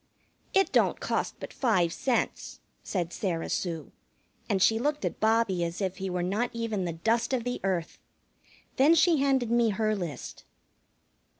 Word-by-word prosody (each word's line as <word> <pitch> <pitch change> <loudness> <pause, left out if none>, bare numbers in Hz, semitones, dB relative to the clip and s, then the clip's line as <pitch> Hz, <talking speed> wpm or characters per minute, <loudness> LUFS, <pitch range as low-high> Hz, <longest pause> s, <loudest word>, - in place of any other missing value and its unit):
"It 385 -2 +3
don't - - +2
cost - - -2
but - - -8
five 185 -10 +2
cents," 255 -3 -2 0.2
said 175 -3 -3
Sarah 170 -5 -2
Sue, 165 -5 -3 0.6
and 195 - +2
she 225 +4 +4
looked 295 +4 -1
at - - -3
Bobbie 220 -5 +2
as 170 +1 -3
if 190 -2 -2
he 190 0 -3
were 180 -1 -1
not 205 +7 0
even 225 -5 -2
the 170 - -2
dust 225 +10 0
of 250 -3 0
the 245 +1 -3
earth. 185 -4 -2 0.8
Then 290 +5 +6
she 335 0 +4
handed 270 -4 +1
me 235 -1 +3
her 215 +1 0
list. 170 -9 -6
215 Hz, 165 wpm, -28 LUFS, 180-240 Hz, 0.8 s, Then